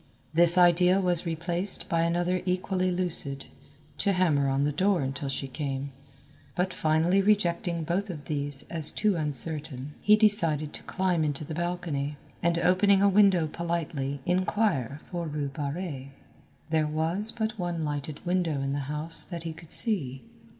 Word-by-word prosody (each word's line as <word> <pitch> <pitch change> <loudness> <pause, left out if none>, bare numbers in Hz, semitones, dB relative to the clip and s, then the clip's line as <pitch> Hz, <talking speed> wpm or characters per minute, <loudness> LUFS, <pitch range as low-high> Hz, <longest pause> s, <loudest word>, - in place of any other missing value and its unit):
This 170 +2 +5
idea 180 +1 +4
was 180 -2 +1
replaced 170 +4 +1
by 165 -1 0
another 175 +2 0
equally 185 0 -1
lucid, 170 -7 -2 0.5
to 200 -1 +2
hammer 155 -7 +1
on 135 +1 0
the 145 - +1
door 185 +4 +1
until 135 +1 -4
she 135 0 -3
came; 135 0 -5 0.6
but 185 0 -1
finally 160 +5 +2
rejecting 175 -4 0
both 185 +6 -2
of 150 -5 -7
these 145 -2 -1
as 160 -3 -2
too 210 -2 0
uncertain, 150 -2 +3
he 210 - +5
decided 165 -9 +2
to - - -6
climb 180 -3 0
into 150 0 -3
the 160 - -7
balcony, 165 -4 -3 0.2
and 170 0 +1
opening 190 +3 +3
a - - +5
window 195 -4 +4
politely 155 -4 -4
inquire 180 - -1
for 170 -2 -4
Rue 145 -2 -3
Barrée. 145 -1 -5 0.6
There 155 -1 +1
was 165 +8 -1
but 220 -2 -4
one 175 -3 -3
lighted 145 0 -5
window 175 -5 0
in 135 0 -2
the 140 -1 -4
house 150 +2 -1
that 170 -1 -7
he 165 -1 -5
could 165 0 -14
see. 135 - +4
165 Hz, 155 wpm, -27 LUFS, 145-180 Hz, 0.6 s, This